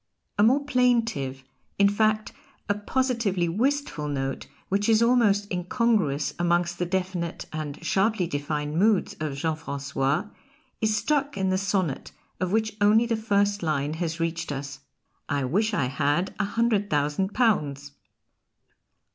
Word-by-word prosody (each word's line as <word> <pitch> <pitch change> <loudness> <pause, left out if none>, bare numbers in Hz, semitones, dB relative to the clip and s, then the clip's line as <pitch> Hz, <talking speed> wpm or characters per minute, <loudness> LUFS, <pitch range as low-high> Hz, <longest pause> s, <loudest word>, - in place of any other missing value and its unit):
A - - +6
more 265 +7 +4
plaintive, 230 - +1 0.3
in 200 - +5
fact 215 +1 +1 0.4
a 205 - +2
positively 210 -4 0
wistful 235 - -1
note, 135 -2 -3 0.2
which 200 +3 0
is 225 +1 +5
almost 225 -4 +3
incongruous 180 - 0
amongst 175 0 +1
the 175 - 0
definite 180 -2 -2
and 155 0 -5
sharply 195 +1 +2
defined 150 0 -2
moods 210 -1 +2
of 155 -3 -3
Jean 160 +1 0
Francois, 140 0 -2 0.6
is 215 -1 +2
struck 285 +5 0
in 190 -1 +1
the - - +2
sonnet 190 -7 -1 0.3
of 185 -1 -1
which 220 0 0
only 215 +3 +5
the 230 -1 0
first 205 -2 +1
line 150 -3 -1
has 165 0 -3
reached 165 -1 -2
us: 140 0 -5 0.5
"I 145 -2 0
wish 210 - +1
I 205 -11 +1
had 145 +7 0
a 210 - +2
hundred 215 -1 +1
thousand 150 +7 0
pounds." 145 - +1
190 Hz, 140 wpm, -26 LUFS, 150-220 Hz, 0.6 s, A